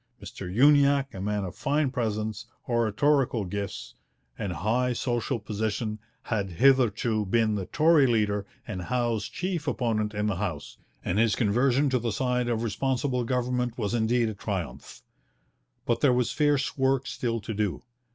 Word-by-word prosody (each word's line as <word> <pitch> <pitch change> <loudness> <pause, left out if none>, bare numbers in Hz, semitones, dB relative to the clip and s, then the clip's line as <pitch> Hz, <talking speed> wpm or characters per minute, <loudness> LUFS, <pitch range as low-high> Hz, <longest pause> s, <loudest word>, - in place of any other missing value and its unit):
Mr 90 -2 -8
Uniacke, 140 +3 +4
a 95 - -6
man 105 0 -1
of 90 -2 -5
fine 145 -1 0
presence, 110 -1 -3 0.2
oratorical 120 0 +1
gifts, 100 0 -5 0.4
and 95 +7 -4
high 125 +7 0
social 120 +1 -1
position, 110 +1 -3 0.2
had 100 -5 -2
hitherto 120 -2 +3
been 110 +2 +1
the 100 -3 -3
Tory 155 -3 +4
leader 105 -4 +1 0.2
and 95 -5 -4
Howe's 120 0 -1
chief 180 -4 -3
opponent 110 -3 -1
in 105 0 -1
the 105 -4 0
House, 90 -7 -4 0.3
and 95 - 0
his 115 -2 +3
conversion 125 +5 +2
to 130 - +2
the 115 0 -2
side 125 +2 0
of 115 -1 -1
Responsible 125 +3 -1
Government 125 -1 -1
was 105 -2 -2
indeed 115 0 +2
a - - -4
triumph. 100 -5 -6 0.8
But 120 - 0
there 140 -4 +5
was 125 -1 +1
fierce 145 -2 +1
work 135 -1 +1
still 115 -3 -2
to 110 +1 -5
do. 105 -1 -2
115 Hz, 155 wpm, -27 LUFS, 105-130 Hz, 0.8 s, there